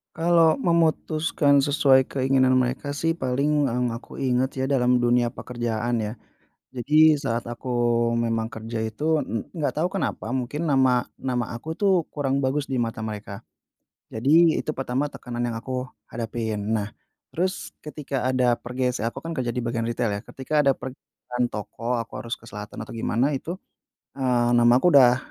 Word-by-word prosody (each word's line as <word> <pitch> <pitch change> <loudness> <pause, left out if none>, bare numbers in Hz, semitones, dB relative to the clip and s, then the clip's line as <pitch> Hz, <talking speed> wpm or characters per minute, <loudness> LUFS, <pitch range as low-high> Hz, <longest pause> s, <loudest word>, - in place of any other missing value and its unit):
Kalau 165 -1 +4
memutuskan 155 -4 +2
sesuai 135 -2 +4
keinginan 130 -1 +2
mereka 130 +3 -1
sih, 165 +3 0
paling 145 +1 +1
yang 125 -1 -1
aku 115 - -10
ingat 130 0 +1
ya, 130 - 0
dalam 125 -2 +3
dunia 120 0 +2
pekerjaan 120 -1 -2
ya. 105 - -3 0.6
Jadi 155 +5 +5
saat 120 -6 -2
aku 120 +2 -6 0.5
memang 115 -1 -1
kerja 110 0 -5
itu 150 +8 0
en 115 -5 -4
enggak 155 -2 -2
tahu 170 - +2
kenapa 120 - -2
mungkin 130 +6 -2
nama 130 -4 +3
nama 125 -3 -3
aku 160 +8 -6
tuh 200 -2 +3 0.2
kurang 140 -1 -1
bagus 140 +2 0
di 135 - -4
mata 115 -2 -2
mereka, 105 -2 -6 0.7
jadi 155 +8 +4
itu 155 - -3
pertama 135 +1 -1
tekanan 120 -2 -4
yang 120 - -2
aku 130 +1 -3 0.2
hadapin. 110 -2 -3
Nah, 105 -2 -1 0.4
terus 185 +3 -2 0.2
ketika 140 -4 -4
ada 125 -2 +2
pergeser 125 -1 -2
aku 130 +3 -5
kan 165 +2 -5
kerja 120 -2 -1
di 125 - -2
bagian 115 -1 -2
ritel 115 -1 -1
ya, 100 +3 -4
ketika 145 +2 -1
ada 135 - +5
pergeseran 125 -1 -5
toko 115 +3 -3
aku 115 - -9
harus 115 0 -5
ke 115 - -9
selatan 105 0 -8
atau - - -8
gimana 120 +4 +1
itu, 150 +4 -3 0.6
eee, 125 -3 +1
nama 120 0 +5
aku 175 +7 +3
udah 125 -3 +7
125 Hz, 165 wpm, -24 LUFS, 120-145 Hz, 0.7 s, udah